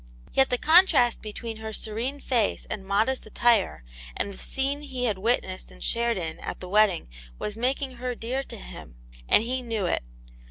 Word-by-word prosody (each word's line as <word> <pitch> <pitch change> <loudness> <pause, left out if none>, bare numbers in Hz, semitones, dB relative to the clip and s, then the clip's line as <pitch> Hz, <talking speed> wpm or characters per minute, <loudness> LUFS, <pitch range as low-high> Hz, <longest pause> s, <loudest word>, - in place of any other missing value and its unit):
Yet 270 0 +4
the 250 - +2
contrast 315 -6 +5
between 220 +1 -6
her 220 0 -6
serene 230 +7 -3
face 240 -7 0
and 195 - -3
modest 215 +7 +1
attire 215 - +2 0.3
and 200 - -2
the - - -11
scene 275 +2 -1
he 260 -4 -3
had 210 -5 0
witnessed 190 -3 -1
and - - -11
shared 235 -1 +1
in 160 -3 -4
at - - -5
the 185 - -7
wedding 205 -2 +3 0.3
was 210 - -4
making 260 +2 -1
her 250 0 -3
dear 245 +4 -2
to - - -7
him, - - -10 0.3
and 210 - +6
he 255 +2 -1
knew 225 -5 -2
it. 175 - 0
230 Hz, 185 wpm, -26 LUFS, 205-255 Hz, 0.3 s, and